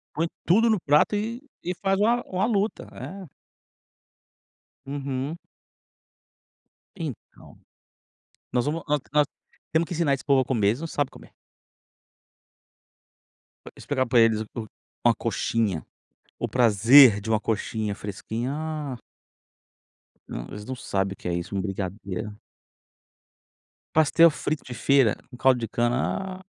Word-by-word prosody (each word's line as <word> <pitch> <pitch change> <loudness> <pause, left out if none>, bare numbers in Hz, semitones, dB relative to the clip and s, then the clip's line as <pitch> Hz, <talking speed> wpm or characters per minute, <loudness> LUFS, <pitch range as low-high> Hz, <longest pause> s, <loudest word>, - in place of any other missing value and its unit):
Põe 165 +2 +1 0.2
tudo 225 +7 +4
no 215 -3 +3
prato 150 +6 +3
e 225 +4 -3 0.2
e 180 +1 -3
faz 195 +1 0
uma 235 +3 +3
uma 185 +2 -1
luta, 215 -2 -1
é. 190 -3 -8 1.6
Uhum. 140 +2 -4 1.6
Então, 155 - -8 1.0
nós 125 -1 +1
vamos 160 +3 -1
nós 150 0 +2
nós 150 0 +4 0.5
temos 160 +2 +2
que 175 - -5
ensinar 155 -4 +2
esse 135 - -7
povo 140 -2 +4
a - - +1
comer. 115 -6 +1
Eles 115 +6 0
não 165 - -3
sabem 145 -4 -1
comer. - - -16 2.4
Explicar 130 -3 -1
para 120 0 +3
eles 110 -1 +3
o 110 -2 -5 0.4
o - - +8
uma - - +3
coxinha, 105 -8 -1 0.6
o - - -1
prazer 115 0 +7
de 110 - -6
uma 110 - +3
coxinha 110 -1 -2
fresquinha. 110 +5 -4
Ah! 155 -3 -4 1.3
Não, - - -6
eles 105 0 -8
não 130 - -4
sabem 95 -5 -2
o - - -14
que 90 - -8
é 85 - -1
isso. 85 +3 -4
Um 95 - 0
brigadeiro. 100 +2 -5 1.6
Pastel 160 +2 +6
frito 155 0 -3
de 125 - -8
feira, 135 -4 +3 0.2
um - - -9
caldo 130 0 +4
de 115 - -3
cana. 130 - -1
Ah! - - -23
130 Hz, 140 wpm, -25 LUFS, 110-165 Hz, 2.4 s, o